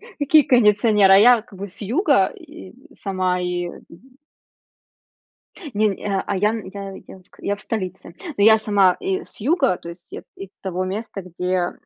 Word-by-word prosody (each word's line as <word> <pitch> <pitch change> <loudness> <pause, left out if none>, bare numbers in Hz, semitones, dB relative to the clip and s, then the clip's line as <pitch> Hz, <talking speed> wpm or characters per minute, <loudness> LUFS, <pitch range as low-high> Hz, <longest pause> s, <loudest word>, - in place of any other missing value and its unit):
К 470 -3 -18
какие 300 +2 +5
кондиционеры, 210 -4 +4
а - - +8
я 235 +1 +6
как 210 -5 -17
бы 200 +1 -6
с 195 - -12
юга 265 - +2
и 320 - -13 0.2
сама, 185 -2 -2
и 180 0 -2 2.1
Нень 205 -1 0
а 195 -2 -1
а, 200 - -1
я 210 +3 +2
нь 220 -4 -6
я 195 -1 -7
я 190 - -12
к, - - -24
я 205 - -1
в 205 - -14
столице, 185 -5 -5 0.2
ну 200 - +2
я 220 0 +7
сама 200 -4 +3
из 380 0 -4
юга, 270 - +1
то 170 - -10
есть 170 0 -14
я - - -7
из 195 -1 -9
того 185 -1 -3
места, 200 +1 -5
где 180 0 -2
200 Hz, 175 wpm, -21 LUFS, 185-230 Hz, 2.1 s, а